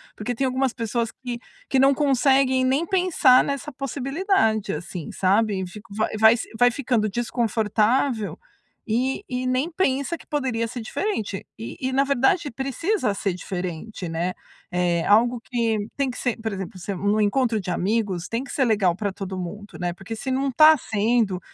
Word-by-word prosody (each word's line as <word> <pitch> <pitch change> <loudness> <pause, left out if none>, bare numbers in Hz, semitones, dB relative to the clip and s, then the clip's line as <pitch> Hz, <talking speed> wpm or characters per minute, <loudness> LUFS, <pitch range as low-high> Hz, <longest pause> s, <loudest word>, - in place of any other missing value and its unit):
porque 215 +3 -3
tem 265 +3 -1
algumas 260 0 0
pessoas 230 0 -2
que 245 -2 -6 0.3
que 270 - +2
não 270 +1 +5
conseguem 265 -1 +3
nem 270 +5 +2
pensar 360 -9 +4
nessa 280 +1 -3
possibilidade, 275 - 0
assim, 170 +1 -6
sabe? 200 0 +1
Fico 210 +3 -12
vai 215 +1 0
vai 220 +1 +7
se - - -6
vai 245 +2 +5
ficando 245 -4 0
desconfortável 225 +1 0 0.5
e 255 - 0
e 255 0 -2
nem 255 +6 0
pensa 315 -1 0
que - - -17
poderia 255 -6 -1
ser 240 +1 -6
diferente. 220 - -3
E 225 - -7
e, 260 0 -2
na 270 +1 +4
verdade, 280 +4 +2
precisa 275 - -1
ser 195 -1 -1
diferente, 180 +1 -5
né, 170 +3 -1 0.4
é, 175 -1 0
algo 235 +4 +4
que 225 -4 -1
tem 275 -2 0
que 250 - -6
ser, 245 -3 -1
por 220 0 -2
exemplo, 190 -1 -6
ser 190 +2 -4
num 205 +3 +1
encontro 225 +2 +2
de 180 - -4
amigos, 190 -1 -1
tem 230 +3 -2
que 275 - -9
ser 270 - +1
legal 205 -6 +3
para 200 0 -3
todo 190 -1 -6
mundo, 205 +4 -7
né, 175 -1 -1
porque 195 +5 -7
se 260 - -4
não 270 +1 0
está 310 +4 +7
sendo, 220 -4 0
230 Hz, 175 wpm, -24 LUFS, 205-265 Hz, 0.5 s, vai